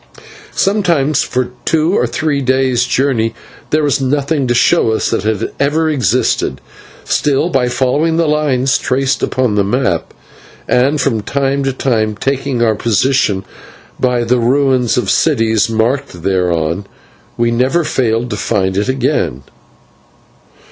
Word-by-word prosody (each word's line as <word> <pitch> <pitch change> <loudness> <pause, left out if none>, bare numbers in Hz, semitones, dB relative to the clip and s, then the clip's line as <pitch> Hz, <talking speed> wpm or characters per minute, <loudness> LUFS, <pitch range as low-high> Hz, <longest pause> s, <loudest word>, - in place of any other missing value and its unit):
Sometimes 170 -8 +1
for 125 -1 -2
two 160 +2 +1
or - - +1
three 155 -3 -1
days' 130 -2 +1
journey 120 -4 0 0.3
there 155 0 +1
was 145 -1 +1
nothing 140 +1 0
to 120 - +1
show 145 +1 +3
us 110 - -1
that - - -1
it 110 -1 0
had - - -4
ever 155 +3 +1
existed, 130 - 0 0.4
still, 145 +3 0
by 130 -6 +1
following 135 +6 0
the 165 - +2
line 150 -4 +1
traced 135 0 0
upon 130 -4 0
the 105 -1 +2
map, 100 -5 -1 0.6
and 135 +4 +2
from 115 -5 0
time 140 +4 -1
to 135 - +1
time 110 -5 -1
taking 135 0 -1
our 110 -2 +3
position 115 -2 +1 0.5
by 125 -2 +1
the 120 +1 +1
ruins 130 0 +2
of 125 - 0
cities 115 -7 +2
marked 115 -4 -1
thereon, 90 -1 -1 0.5
we 115 0 +1
never 130 +8 +1
failed 120 -4 -1
to - - -2
find 95 -3 -1
it 105 +5 0
again. 70 - -1
130 Hz, 140 wpm, -15 LUFS, 115-140 Hz, 0.6 s, show